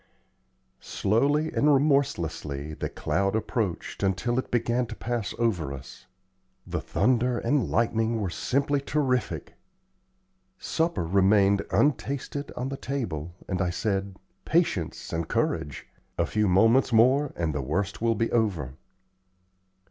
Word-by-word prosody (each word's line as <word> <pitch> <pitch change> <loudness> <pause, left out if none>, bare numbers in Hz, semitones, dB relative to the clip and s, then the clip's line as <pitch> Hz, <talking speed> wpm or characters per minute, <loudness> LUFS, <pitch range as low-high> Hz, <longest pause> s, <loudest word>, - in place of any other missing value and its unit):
Slowly 145 +9 +1
and 150 - +3
remorselessly 85 - 0
the - - -4
cloud 100 +3 -1
approached, 110 -4 -2
until 100 +6 0
it - - -5
began 120 +1 0
to 110 - -7
pass 120 -2 -3
over 100 -11 0
us. 70 0 -10 0.6
The - - -3
thunder 125 -1 +1
and 130 - +1
lightning 115 +5 +1
were 95 -5 -2
simply 140 +7 0
terrific. 135 -4 -1 1.0
Supper 165 - -1
remained 100 +2 +4
untasted 140 0 0
on 125 +2 -2
the 135 - -4
table, 90 - -4
and 95 -1 -1
I 90 - +1
said: 95 +1 -2 0.3
"Patience 155 - 0
and 85 0 -2
courage! 75 - -1 0.3
A - - +2
few 105 -1 +1
moments 115 +8 +4
more 130 +5 +4
and 85 -3 -1
the 75 - -2
worst 95 +11 -2
will 115 0 +2
be 115 +2 -1
over!" 95 - 0
110 Hz, 125 wpm, -27 LUFS, 95-130 Hz, 1.0 s, remained